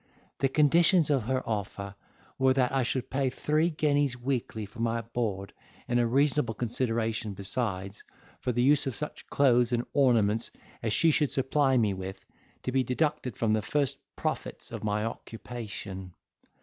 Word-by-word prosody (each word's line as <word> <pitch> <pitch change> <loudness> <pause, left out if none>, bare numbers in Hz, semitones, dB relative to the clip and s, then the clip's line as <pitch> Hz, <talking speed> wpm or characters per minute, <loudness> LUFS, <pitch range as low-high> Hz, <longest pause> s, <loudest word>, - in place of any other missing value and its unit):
The 135 - +2
conditions 160 +3 +4
of 135 -3 +3
her 130 +1 -1
offer 100 -2 -3 0.5
were, 130 0 +5
that 130 -2 +2
I 135 0 +2
should 125 0 -2
pay 135 0 +1
three 155 +5 +1
guineas 145 -4 +1
weekly 120 -4 -2
for 105 +3 -14
my 115 0 0
board, 110 -4 -3 0.3
and 120 0 +2
a 120 - +3
reasonable 135 -2 +2
consideration 115 -3 -1
besides, 100 -1 -2 0.4
for 125 - -1
the 120 0 +1
use 145 +1 +4
of 130 - -2
such 150 - -6
clothes 125 -3 +3
and 120 0 0
ornaments 115 -5 +3 0.3
as 110 - -1
she 165 +9 +4
should 150 -2 +2
supply 135 0 +2
me 105 -4 +2
with, 95 0 -7 0.4
to 130 - -2
be 130 0 +2
deducted 130 -1 -1
from 110 -2 +2
the 110 - +2
first 140 +4 0 0.2
profits - - -4
of - - -6
my 105 +1 0
occupation. 105 -5 -7
120 Hz, 160 wpm, -29 LUFS, 110-135 Hz, 0.5 s, were